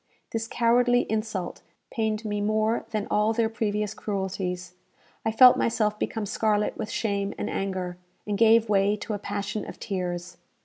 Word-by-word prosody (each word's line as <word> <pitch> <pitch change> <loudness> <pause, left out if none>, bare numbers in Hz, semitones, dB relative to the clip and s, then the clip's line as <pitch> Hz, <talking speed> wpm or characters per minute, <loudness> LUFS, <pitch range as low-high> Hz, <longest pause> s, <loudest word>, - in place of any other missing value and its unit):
This 225 0 -2
cowardly 245 +1 +3
insult 215 -5 -3 0.3
pained 220 -1 -1
me 205 -1 -1
more 215 +2 +1
than 215 -2 -2
all 210 +2 +3
their 225 -1 +1
previous 210 -2 -1
cruelties. 190 -3 -3 0.5
I 225 - +1
felt 250 +3 +8
myself 215 -2 +1
become 220 -2 -2
scarlet 210 +1 0
with 215 - -5
shame 200 -2 -1
and - - -3
anger, 185 -2 -3 0.3
and 210 - -1
gave 225 +1 +5
way 200 0 +3
to 210 +1 -5
a 205 - -3
passion 205 +1 -3
of - - -9
tears. 175 -3 -4
210 Hz, 160 wpm, -26 LUFS, 195-220 Hz, 0.5 s, felt